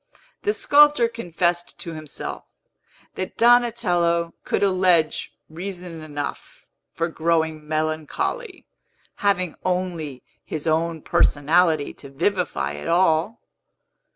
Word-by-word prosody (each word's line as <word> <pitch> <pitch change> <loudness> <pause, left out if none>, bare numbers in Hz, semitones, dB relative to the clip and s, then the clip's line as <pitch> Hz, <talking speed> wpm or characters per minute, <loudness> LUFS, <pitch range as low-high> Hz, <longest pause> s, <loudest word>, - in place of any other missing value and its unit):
The 420 - +1
sculptor 290 -4 +5
confessed 175 -6 -2
to 170 - -6
himself, 155 -2 -6 0.7
that 185 - -5
Donatello 195 -9 +3
could - - 0
allege 185 -5 +2
reason 175 0 -7
enough 145 -2 -6 0.3
for 165 0 -1
growing 160 -2 0
melancholy, 155 - -2 0.5
having 185 -5 +1
only 175 -7 -2 0.2
his 155 -2 -5
own 160 0 0
personality 155 +1 +2
to 140 - -13
vivify 160 - -1
it 75 0 -7
all. 175 +4 +2
170 Hz, 95 wpm, -23 LUFS, 155-190 Hz, 0.7 s, sculptor